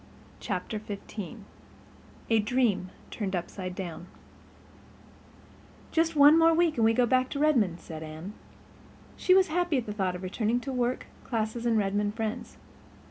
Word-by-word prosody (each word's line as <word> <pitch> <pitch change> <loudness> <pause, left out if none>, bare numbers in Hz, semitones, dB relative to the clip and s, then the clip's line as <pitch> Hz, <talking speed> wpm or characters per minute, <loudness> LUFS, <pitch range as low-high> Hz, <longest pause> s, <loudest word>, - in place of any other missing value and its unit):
Chapter 205 +1 -3
XV 205 0 -7 1.0
A 225 - +5
Dream 210 -4 +1 0.2
Turned 195 -4 -3
Upside 180 +1 -5
Down 175 -2 -6 1.8
"Just 325 0 +1
one 295 +2 +7
more 330 0 +5
week 335 -2 +2
and 225 - +3
we 225 - +5
go 245 +2 +3
back 255 +1 +2
to 280 - -4
Redmond," 235 - +2
said 160 -2 -9
Anne. 160 +5 -8 0.8
She 370 - +4
was 380 -2 +4
happy 345 -2 +1
at 245 - -2
the 210 - -4
thought 190 -3 -1
of 180 - -8
returning 220 +5 0
to 270 +1 -5
work, 250 0 -1 0.2
classes 230 0 -2
and 230 -1 +3
Redmond 205 +1 0
friends. 220 -1 -4
220 Hz, 150 wpm, -28 LUFS, 195-260 Hz, 1.8 s, one